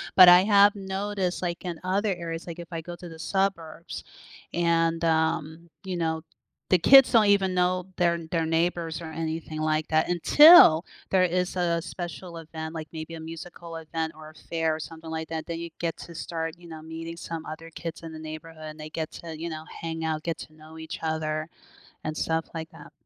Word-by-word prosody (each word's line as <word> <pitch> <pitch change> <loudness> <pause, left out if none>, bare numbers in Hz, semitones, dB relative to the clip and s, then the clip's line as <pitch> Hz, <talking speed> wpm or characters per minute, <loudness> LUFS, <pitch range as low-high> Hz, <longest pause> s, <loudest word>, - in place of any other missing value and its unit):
but 185 -1 +10
I 180 +1 +9
have 205 0 +6
noticed, 195 -1 -2
like, 175 0 -3
in 170 -2 -4
other 195 +2 +1
areas, 170 -1 -6
like, 170 0 -7
if 170 - -8
I 165 - -4
go 175 +2 -8
to 175 - -9
the 160 -1 -11
suburbs 170 -2 -2 0.5
and, 165 -1 +1
um, 160 0 0
you 185 -1 -4
know, 160 -1 -1 0.5
the 185 - +6
kids 270 +9 +8
don't 225 -2 +6
even 195 -2 +3
know 180 0 +1
their 170 -1 +3
their 165 0 0
neighbors, 165 0 0
or - - -6
anything 160 -1 -4
like 155 0 0
that 160 +1 +2
until 180 - +8 0.3
there 190 -1 +4
is 180 +1 0
a 170 -2 +1
special 175 0 -7
event, 160 0 -7
like, 155 -1 -6
maybe 160 0 -7
a 165 - -7
musical 165 +1 -8
event, 160 0 -3
or 155 0 -11
a 155 - -25
fair, 160 -1 -1
or - - -7
something 160 0 -9
like 160 0 -4
that, 160 -1 -4
then 165 -1 -4
you 170 0 -5
get 165 -1 -1
to 170 - -10
start, 165 0 -4
you 175 0 -14
know, 160 -1 -9
meeting 165 +1 -7
some 165 -1 -6
other 160 +1 -8
kids 165 0 -7
in 165 - -7
the 155 - -8
neighborhood, 155 0 -9
and 155 - -15
they 155 - -7
get 160 0 -4
to, 160 -2 -8
you 170 - -4
know, 155 -1 -6 0.2
hang 160 -1 -4
out, 155 -1 -2
get 165 -1 -2
to 155 - -10
know 155 +1 -14
each 160 0 -7
other 155 0 -2 0.6
and 155 0 -3
stuff 160 0 0
like 160 -1 -5
that. 155 -2 -14
165 Hz, 210 wpm, -26 LUFS, 160-175 Hz, 0.6 s, but